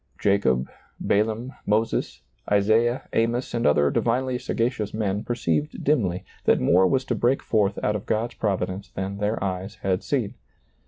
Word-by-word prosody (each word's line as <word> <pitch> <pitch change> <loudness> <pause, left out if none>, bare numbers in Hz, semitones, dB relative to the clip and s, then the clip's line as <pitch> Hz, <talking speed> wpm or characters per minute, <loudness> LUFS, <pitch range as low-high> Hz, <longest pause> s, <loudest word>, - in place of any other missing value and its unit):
Jacob, 65 -11 +2 0.3
Balaam, 110 +5 0
Moses, 110 +2 0 0.3
Isaiah, 110 +5 +2
Amos, 115 +2 0
and 120 -1 +1
other 75 -1 +3
divinely 125 +1 0
sagacious 115 -4 -2
men 105 -1 -1
perceived 80 -11 -1
dimly 100 - +1 0.2
that - - +4
more 90 +8 +4
was 130 +6 +1
to 125 - -1
break 120 +4 +1
forth 105 -3 +1
out 105 - +1
of 105 - -5
God's 115 +2 -1
providence 95 -1 -2
than 95 +1 -5
their 105 +2 0
eyes 95 +2 -3
had 95 -1 +1
seen. 125 -8 -1
105 Hz, 150 wpm, -24 LUFS, 95-120 Hz, 0.3 s, that